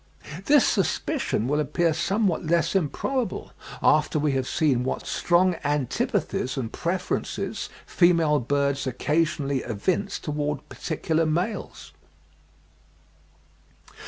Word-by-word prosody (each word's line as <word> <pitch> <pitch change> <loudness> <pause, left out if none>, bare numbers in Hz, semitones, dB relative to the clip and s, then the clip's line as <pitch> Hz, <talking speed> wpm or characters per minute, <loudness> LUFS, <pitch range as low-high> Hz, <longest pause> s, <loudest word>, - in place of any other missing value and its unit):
This 290 -2 +5
suspicion 160 - 0
will 145 +2 +1
appear 160 +3 +1
somewhat 190 +3 0
less 170 -1 +2
improbable 210 - -1 0.3
after - - +3
we 150 -1 +1
have 130 -1 -1
seen 140 -7 +1
what 130 - -3
strong 180 0 +2
antipathies 140 -2 -1
and 115 -4 -3
preferences 180 +2 -2 0.2
female 165 -4 +3
birds 140 +2 0
occasionally 145 +1 0
evince 175 - -1
towards 150 -1 -3
particular 160 0 -1
males. 175 +8 -3
155 Hz, 100 wpm, -25 LUFS, 140-175 Hz, 0.3 s, This